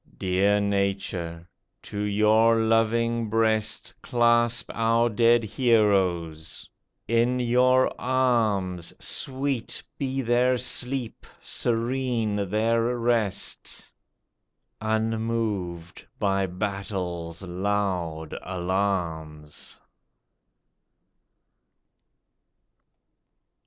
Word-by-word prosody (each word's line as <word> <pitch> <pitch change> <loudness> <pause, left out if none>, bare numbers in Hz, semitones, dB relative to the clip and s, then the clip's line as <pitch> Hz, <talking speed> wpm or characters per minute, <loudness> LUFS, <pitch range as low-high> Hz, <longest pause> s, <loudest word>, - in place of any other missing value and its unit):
Dear 95 +2 +2
Nature, 95 -4 -2 0.4
to 100 - -6
your 110 +2 +3
loving 115 +1 +1
breast 110 -1 0
Clasp 120 -1 +2
our 115 +1 +2
dead 115 +1 +4
heroes! 95 -9 +1 0.4
In 120 +2 +2
your 125 +1 +3
arms 110 -9 +1
Sweet 135 -3 -2 0.2
be 135 -1 -2
their 125 +2 +2
sleep, 125 0 -2
serene 115 -4 -1
their 115 +3 +1
rest. 115 -4 -1 0.9
Unmoved 110 -6 -2
by 95 -1 +1
Battle's 90 -3 -4
loud 90 -4 -2
alarms 85 -5 -3
110 Hz, 65 wpm, -25 LUFS, 95-120 Hz, 0.9 s, dead